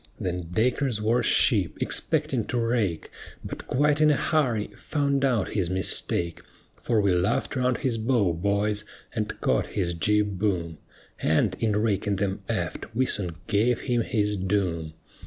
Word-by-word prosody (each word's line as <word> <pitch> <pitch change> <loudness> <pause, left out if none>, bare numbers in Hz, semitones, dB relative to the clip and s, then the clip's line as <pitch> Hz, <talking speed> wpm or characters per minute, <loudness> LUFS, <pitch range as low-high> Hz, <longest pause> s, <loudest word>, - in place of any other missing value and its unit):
Then 90 -2 -3
Dacres 120 +3 +1
wore 115 +3 +2
ship, 105 - +2
expecting - - +1
to - - -2
rake; 115 -8 -1 0.3
But - - -7
quite 150 +3 +2
in 155 - +6
a 150 - +4
hurry, 125 -9 0
found 140 -2 -1
out 120 -8 +1
his 95 -5 -1
mistake; 90 -2 0 0.4
For 115 -3 +1
we 100 -3 +3
luff'd 90 +10 0
round 125 -1 +1
his 125 -5 -1
bow, 110 -6 +2
boys, 100 +4 0 0.3
and 110 -3 -3
caught - - +1
his 90 -3 0
jib 105 +2 +1
boom, 85 -6 -1 0.4
And, 85 +5 +2
in 110 -2 +1
raking 105 -2 0
them 95 0 -2
aft, 110 - -3
we 130 +2 +2
soon 90 -9 -1
gave 115 +4 +1
him 120 -2 0
his 105 -3 0
doom. 90 -5 -1
105 Hz, 155 wpm, -26 LUFS, 95-120 Hz, 0.4 s, in